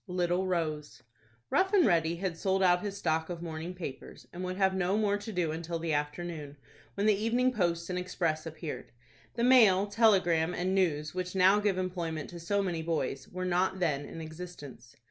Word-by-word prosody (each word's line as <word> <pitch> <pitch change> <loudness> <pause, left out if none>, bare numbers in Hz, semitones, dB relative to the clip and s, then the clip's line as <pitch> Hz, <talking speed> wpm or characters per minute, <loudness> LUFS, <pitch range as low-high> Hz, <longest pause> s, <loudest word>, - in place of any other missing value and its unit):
LITTLE 180 0 0
ROSE. 155 -4 -3 0.5
Rough 380 +2 +2
and 375 -6 +6
Ready 165 -3 +2
had 180 -1 -3
sold 190 +2 0
out 180 -1 +4
his 200 -1 -4
stock 160 -3 0
of 170 -1 -5
morning 165 +2 -5
papers, 140 -7 -8
and 180 +1 -6
would 185 0 -3
have 190 -1 +3
no 190 +1 +1
more 210 -2 +2
to 215 +2 -7
do 175 -5 0
until 165 +1 -4
the 165 -1 -2
afternoon, 150 0 -4 0.4
when 200 - -1
the 215 - +5
"Evening 235 +5 +1
Post" 170 -5 0
and 180 -1 -2
"Express" 170 -3 -2
appeared. 160 -1 -7 0.4
The 235 - -1
"Mail," 220 -7 +6
"Telegram," 190 -6 +3
and 185 +2 -1
"News," 155 -6 +1
which 180 0 -4
now 190 +2 +5
give 205 -3 +1
employment 175 -4 -3
to 175 - -8
so 200 +4 0
many 175 -4 -2
boys, 160 -5 -2
were 185 0 -5
not 185 +1 +1
then 145 -5 0
in 165 - -8
existence. 155 -7 -10
180 Hz, 190 wpm, -30 LUFS, 160-190 Hz, 0.5 s, and